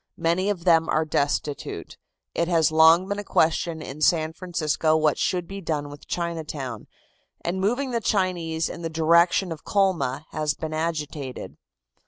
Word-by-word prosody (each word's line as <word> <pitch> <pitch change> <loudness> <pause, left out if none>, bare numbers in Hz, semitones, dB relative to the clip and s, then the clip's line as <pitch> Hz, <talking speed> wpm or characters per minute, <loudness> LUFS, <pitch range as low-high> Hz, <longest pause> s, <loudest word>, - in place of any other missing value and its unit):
Many 170 +4 +1
of 185 -4 -3
them 165 -2 +4
are 155 +1 +2
destitute. 145 -1 -2 0.4
It 170 - 0
has 165 -2 +3
long 160 +3 +6
been 200 +1 -2
a - - -4
question 160 -2 +1
in 145 +3 -8
San 160 0 +2
Francisco 160 -2 0
what 155 -2 +2
should 180 -2 0
be 195 0 -7
done 150 -4 -2
with 145 0 -12
Chinatown, 155 -9 -4 0.5
and 185 +2 -2
moving 245 +7 0
the 235 -1 -1
Chinese 175 -6 0
in - - -7
the 165 - -3
direction 170 +3 +3
of 160 - -7
Colma 170 - 0
has 155 -2 -1
been 155 0 -5
agitated. 155 -4 -4
165 Hz, 160 wpm, -25 LUFS, 155-180 Hz, 0.5 s, long